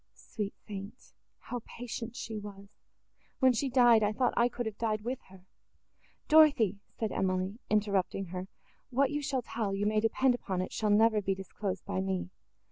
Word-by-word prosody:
Sweet 210 -2 -5
saint! 200 +3 -8 0.2
how 245 -1 -6
patient 235 -1 -6
she 225 -4 -5
was! 200 0 -11 0.6
When 260 -2 +5
she 270 +3 0
died, 240 -3 +6
I 210 0 +2
thought 250 +2 +1
I 235 +1 +4
could 240 0 -4
have 215 -2 -5
died 215 -2 0
with 245 +4 -3
her!" 185 -1 -16 0.8
"Dorothée," 285 - +5 0.2
said 220 -2 -1
Emily, 185 +3 -1
interrupting 200 -2 +1
her, 185 +1 -4 0.4
"what 270 +3 +2
you 295 0 -1
shall 270 -3 -1
tell, 210 -4 -2
you 200 +1 -1
may 215 0 +2
depend 245 +4 +3
upon 190 -6 -3
it, - - -7
shall 215 - 0
never 215 +1 +4
be 195 -1 0
disclosed 190 -1 -5
by 90 - -2
me. 95 -2 -2
215 Hz, 175 wpm, -31 LUFS, 195-245 Hz, 0.8 s, died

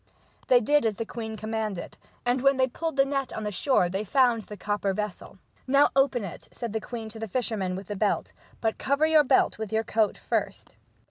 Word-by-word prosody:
They 245 -1 +6
did 295 +5 +3
as 215 - -1
the 230 - -4
queen 220 -1 -6
commanded, 215 -4 -4 0.3
and 245 +1 +1
when 275 0 +4
they 260 - +4
pulled 320 +4 -4
the 275 0 +4
net 275 -1 -2
on 220 - -4
the 210 - -2
shore 205 -1 +2
they 190 +4 -2
found 240 +1 +3
the 210 0 -10
copper 205 -1 -1
vessel. 210 -2 -5 0.2
" - - -35
Now 280 +2 +5
open 270 -4 +3
it," 185 - -8
said 235 -3 -5
the 220 - -1
queen 230 -1 -6
to 220 - -9
the 225 - -4
fisherman 210 -5 -1
with 195 +1 -6
the 205 - -5
belt, 205 +1 0
" - - -28
but 225 -1 -1
cover 280 +3 +2
your 315 -1 +5
belt 260 -5 +2
with 220 -2 -4
your 220 0 +1
coat 220 -2 +1
first." - - -3
225 Hz, 225 wpm, -27 LUFS, 210-265 Hz, 0.3 s, They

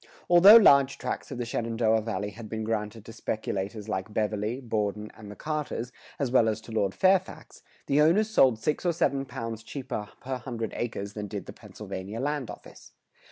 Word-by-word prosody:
Although 185 +5 +10
large 140 -11 +6
tracts - - -4
of 135 - -6
the 120 - -3
Shenandoah 115 -1 0
Valley 105 -2 -3
had 110 +1 -10
been 110 0 -3
granted 110 -1 -3
to 115 - -10
speculators 105 -1 -4
like 100 0 -3
Beverley, 105 +3 -1
Borden, 105 -4 -2
and 105 -2 -11
the 105 - -9
Carters, 150 -5 -4 0.3
as 135 -4 -1
well 120 -3 +4
as 110 - -2
to 115 - -12
Lord 100 -3 0
Fairfax, 190 0 +1 0.2
the 140 +2 +3
owners 180 +8 +4
sold 130 - +4
six 150 +7 -1
or 175 -1 +2
seven 140 -4 0
pounds 115 -3 -6
cheaper 115 -4 -6
per 130 0 -4
hundred 120 -3 -5
acres 105 -4 -4
than 105 0 -5
did - - -6
the - - -9
Pennsylvania 95 +4 -8
land 145 -1 -2
office. - - -12
115 Hz, 185 wpm, -27 LUFS, 105-135 Hz, 0.3 s, Although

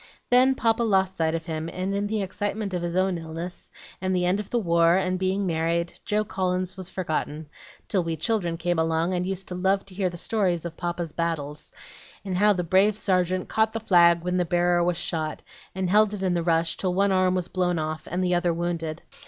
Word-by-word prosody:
Then 255 +2 +5
Papa 230 -1 +1
lost 190 -4 +2
sight 160 -1 0
of 165 0 -4
him, 160 -1 -4
and 185 +3 -3
in 200 +1 -1
the 210 -1 -1
excitement 205 +1 -3
of 180 - -1
his 175 0 -3
own 185 -1 +1
illness, 165 +2 -7 0.3
and 185 0 0
the 180 -1 +1
end 185 +3 +2
of 210 - -6
the 245 - 0
war, 170 -4 +3
and 185 -1 0
being 190 +1 0
married, 170 0 -1
Joe 210 0 +1
Collins 185 -1 -2
was 185 -2 -5
forgotten, 160 -4 -3 0.4
till 190 -4 +1
we 165 -1 -3
children 170 -1 -1
came 175 0 0
along, 165 +2 +1
and 180 0 -1
used 190 0 -3
to - - -4
love 190 +2 +1
to 195 - -13
hear 185 -1 0
the 175 - -8
story 195 -1 +1
of 170 0 -6
Papa's 175 -1 -3
battles, 150 -3 -3 0.5
and 185 -2 -2
how 210 +1 +5
the 180 -3 0
brave 195 +5 +3
sergeant 185 -2 0
caught 220 0 +1
the 225 - -2
flag 170 -5 +5
when 180 0 -1
the 180 - +2
bearer 175 0 +2
was 175 -1 0
shot, 155 -2 -2 0.3
and 190 -1 -1
held 210 +2 +4
it 195 - -6
in 185 -2 +1
the 175 - 0
rush 165 -1 +1
till 180 -2 -1
one 200 +1 +3
arm 185 -1 +3
was 180 -2 -1
blown 180 -2 0
off 155 0 -4
and 180 +2 -1
the 180 0 +1
other 175 0 +2
wounded. 165 -1 -3
180 Hz, 225 wpm, -25 LUFS, 170-190 Hz, 0.5 s, Then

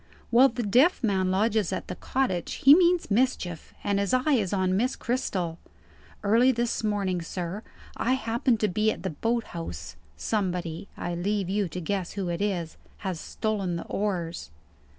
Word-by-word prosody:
"While 255 +3 +7
the 240 +1 -3
deaf 250 - +4
man 190 -4 +2
lodges 205 +1 +1
at - - -3
the 180 - -5
cottage, 190 -6 -1
he 275 - +7
means 350 - +4
mischief, 200 -8 0
and 200 -1 +1
his 200 +5 +1
eye 260 +4 +2
is 210 -8 +1
on 185 -2 +1
Miss 245 +6 +1
Cristel. 185 -9 -2 0.6
Early 230 +5 +5
this 235 -2 -1
morning, 200 -4 0
sir, 175 +4 -4 0.3
I 255 - +1
happened 235 -1 +1
to 215 - +3
be 215 +3 +2
at - - -7
the 190 - -2
boat 230 +9 0
house. 85 - -6 0.2
Somebody 180 - -2
(I 175 - -3
leave 190 +2 -1
you 200 -1 +1
to 180 - -6
guess 180 +1 -2
who 195 -3 -3
it 170 +2 -2
is) 180 -6 -2 0.3
has 185 -4 -2
stolen 200 -4 -2
the 170 - -5
oars." 175 - -3
200 Hz, 170 wpm, -27 LUFS, 175-230 Hz, 0.6 s, While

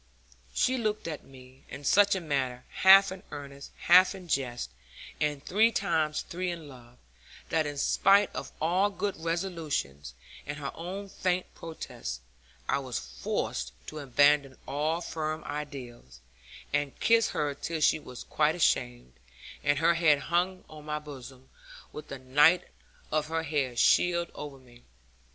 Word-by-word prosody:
She 255 0 +2
looked 215 -5 -2
at 155 -3 -5
me 130 0 -16
in 145 - -8
such 200 +7 +5
a - - -1
manner, 130 -5 -2
half 195 0 +7
in 190 0 -7
earnest, 140 -1 -9
half 185 +2 +6
in 185 -2 -11
jest, 125 - -2 0.5
and 150 -2 -1
three 220 +4 +4
times 160 -7 0
three 180 +1 -4
in 165 -3 -6
love, 125 -3 -14 0.5
that 160 -2 +1
in 145 -1 -5
spite 195 +7 +4
of - - -5
all 180 +6 +2
good 205 0 -3
resolutions, 160 - -3 0.3
and 150 0 -4
her 140 -2 -4
own 190 +4 -6
faint 185 -1 -2
protest, 65 - -7 0.5
I - - +1
was 130 -3 -4
forced - - -3 0.2
to 155 - -7
abandon 145 0 +3
all 155 +4 -1
firm 160 -1 -4
ideas, 130 - -7 0.5
and 145 -1 -1
kiss 230 0 +4
her 145 -1 -1
till 165 +3 -4
she 155 - +3
was 125 -5 -10
quite - - +1
ashamed, - - 0 0.5
and 145 -1 +2
her 165 +3 +4
head 165 -3 +4 0.2
hung 185 +2 +1
on 150 -1 -12
my 150 0 -2
bosom, 135 -3 -10 0.5
with 150 - -8
the 140 - -6
night 150 +7 +4 0.5
of 155 0 0
her 165 0 -2
hair 140 -5 -1
shed 170 +6 +3
over 145 -2 -8
me. 120 -2 -19
150 Hz, 150 wpm, -29 LUFS, 135-175 Hz, 0.5 s, half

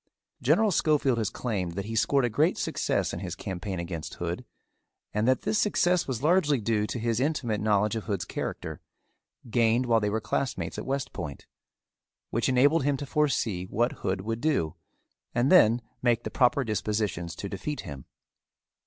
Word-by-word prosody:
General 220 -2 +3
Schofield 145 -7 +2
has 110 - 0
claimed 95 -8 -3
that 100 +3 -4
he 115 +1 -4
scored 135 +4 +3
a - - +1
great - - +2
success - - -1
in - - -4
his - - -5
campaign 95 0 -4
against 85 -2 -5
Hood - - -4 0.7
and 105 +2 +1
that 130 0 +2
this 215 - +1
success 180 -3 +2
was 130 -2 -3
largely 150 -4 +3
due 105 -1 0
to - - -4
his 115 0 0
intimate 130 -7 0
knowledge 105 0 +2
of 110 - -4
Hood's 100 -5 -2
character, - - -5 0.7
gained 115 +1 +3
while 115 -2 +4
they 105 -1 0
were 110 +2 0
classmates 130 +4 -2
at - - -7
West 135 -1 -2
Point, 75 -5 -6 0.9
which 115 +2 +1
enabled 140 +5 +4
him 140 0 +1
to 145 - -5
foresee 130 - 0
what 120 +6 0
Hood 95 0 -3
would 115 +3 -3
do 145 - +1 0.6
and 120 +3 +2
then 120 -9 +6 0.2
make 120 -2 +2
the - - -5
proper 130 +2 +3
dispositions 105 -6 -2
to 100 - -5
defeat 125 +10 -4
him. 70 -3 -8
115 Hz, 175 wpm, -28 LUFS, 105-135 Hz, 0.9 s, then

